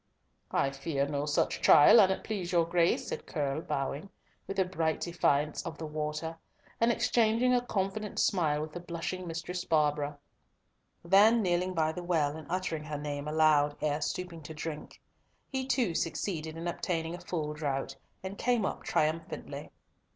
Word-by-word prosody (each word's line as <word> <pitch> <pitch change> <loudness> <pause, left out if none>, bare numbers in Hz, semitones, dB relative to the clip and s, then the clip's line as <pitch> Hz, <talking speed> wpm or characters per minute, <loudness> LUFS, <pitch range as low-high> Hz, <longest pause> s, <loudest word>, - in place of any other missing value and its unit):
"I 135 - +1
fear 140 0 -2
no 145 0 -2
such 145 - 0
trial, 150 +10 +8
an't 190 -1 +2
please 195 -5 -3
your 170 -2 +3
Grace," 170 0 +2
said - - -5
Curll, 145 -2 -2
bowing, 140 +4 -3 0.4
with 195 - -5
a 190 - +3
bright 165 -3 -1
defiance 150 -4 +1
of 165 -2 -6
the 160 - -5
water, 155 +2 -4 0.4
and 230 +1 +4
exchanging 235 +2 +2
a 245 -1 +2
confident 205 -1 -2
smile 155 -6 +2
with 155 - -7
the 175 - -6
blushing 175 +1 -5
Mistress 170 +2 -4
Barbara—then 155 +7 +1
kneeling 180 0 0
by 160 -1 +2
the 180 - -6
well, 160 -5 +1
and 160 -1 -9
uttering 170 -4 -2
her 150 -1 -4
name 145 0 -4
aloud 150 -1 +3
ere 150 0 0
stooping 170 +2 -4
to 155 +1 -9
drink. 155 -1 -6 0.5
He 265 -1 -2
too 240 -10 +1
succeeded 160 -1 -2
in 170 +1 -4
obtaining 165 -1 -2
a 175 - -6
full 160 -4 -3
draught, 145 -3 -3 0.3
and 190 +1 -6
came 240 -4 +2
up - - -3
triumphantly. 160 +2 -2
165 Hz, 160 wpm, -30 LUFS, 150-185 Hz, 0.5 s, trial